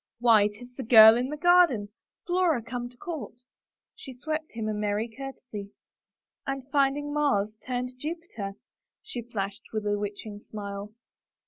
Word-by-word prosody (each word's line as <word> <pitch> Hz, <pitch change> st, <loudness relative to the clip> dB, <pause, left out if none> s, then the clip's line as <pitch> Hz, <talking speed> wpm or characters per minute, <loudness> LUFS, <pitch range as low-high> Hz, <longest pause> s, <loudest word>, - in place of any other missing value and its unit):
" -, -, -63 dB
Why, 225 Hz, -4 st, +6 dB
'tis 245 Hz, +4 st, -11 dB
the 265 Hz, -, -6 dB
girl 220 Hz, -2 st, +9 dB
in 250 Hz, +2 st, 0 dB
the 300 Hz, -, -4 dB
garden 340 Hz, -, +4 dB, 0.2 s
— -, -, -65 dB
Flora 350 Hz, -8 st, +2 dB
come 240 Hz, +1 st, -5 dB
to 245 Hz, -, -18 dB
court! 315 Hz, -9 st, -7 dB, 0.3 s
" -, -, -65 dB
She 260 Hz, -3 st, -10 dB
swept 310 Hz, +3 st, -4 dB
him 225 Hz, -2 st, -3 dB
a 215 Hz, -, 0 dB
merry 210 Hz, +1 st, -1 dB
courtesy. 230 Hz, -4 st, -8 dB, 0.4 s
" -, -, -32 dB
And 275 Hz, -1 st, -3 dB
finding 290 Hz, +1 st, +1 dB
Mars 215 Hz, -9 st, +1 dB
turned 250 Hz, 0 st, -2 dB
Jupiter," 300 Hz, -, -5 dB, 0.5 s
she 260 Hz, -, -5 dB
flashed 205 Hz, -2 st, -5 dB
with 215 Hz, -1 st, -3 dB
a 205 Hz, 0 st, +1 dB
witching 205 Hz, 0 st, -5 dB
smile. 200 Hz, -1 st, -7 dB
240 Hz, 165 wpm, -28 LUFS, 210-280 Hz, 0.5 s, girl